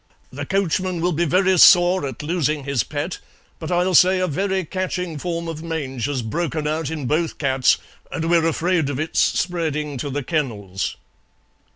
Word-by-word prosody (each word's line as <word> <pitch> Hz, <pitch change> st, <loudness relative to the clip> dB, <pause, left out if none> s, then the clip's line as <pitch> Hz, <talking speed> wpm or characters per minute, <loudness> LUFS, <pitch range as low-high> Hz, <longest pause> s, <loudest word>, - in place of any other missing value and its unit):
The 145 Hz, +2 st, -6 dB
coachman 185 Hz, -2 st, 0 dB
will 175 Hz, +2 st, +1 dB
be 170 Hz, +1 st, 0 dB
very 185 Hz, +3 st, +3 dB
sore 175 Hz, -3 st, +6 dB
at 130 Hz, +1 st, -7 dB
losing 150 Hz, -3 st, -1 dB
his 135 Hz, -5 st, 0 dB
pet, 150 Hz, +4 st, -4 dB, 0.4 s
but 160 Hz, +1 st, -5 dB
I'll 180 Hz, +1 st, +1 dB
say 185 Hz, +2 st, +6 dB
a 185 Hz, -, +1 dB
very 190 Hz, +3 st, -1 dB
catching 180 Hz, -2 st, -3 dB
form 170 Hz, +1 st, -3 dB
of 160 Hz, -1 st, -5 dB
mange 145 Hz, -7 st, -4 dB
has 135 Hz, -4 st, -2 dB
broken 160 Hz, +5 st, -2 dB
out 155 Hz, -1 st, -1 dB
in 155 Hz, -4 st, -4 dB
both 160 Hz, +5 st, 0 dB
cats 130 Hz, -2 st, +2 dB, 0.3 s
and 165 Hz, -2 st, -2 dB
we're 165 Hz, -1 st, +3 dB
afraid 165 Hz, -2 st, +1 dB
of 140 Hz, -1 st, -3 dB
it 155 Hz, +1 st, -4 dB
spreading 150 Hz, -5 st, 0 dB
to 145 Hz, -, -3 dB
the 140 Hz, +1 st, -3 dB
kennels." 105 Hz, -, -3 dB
160 Hz, 175 wpm, -21 LUFS, 145-180 Hz, 0.4 s, sore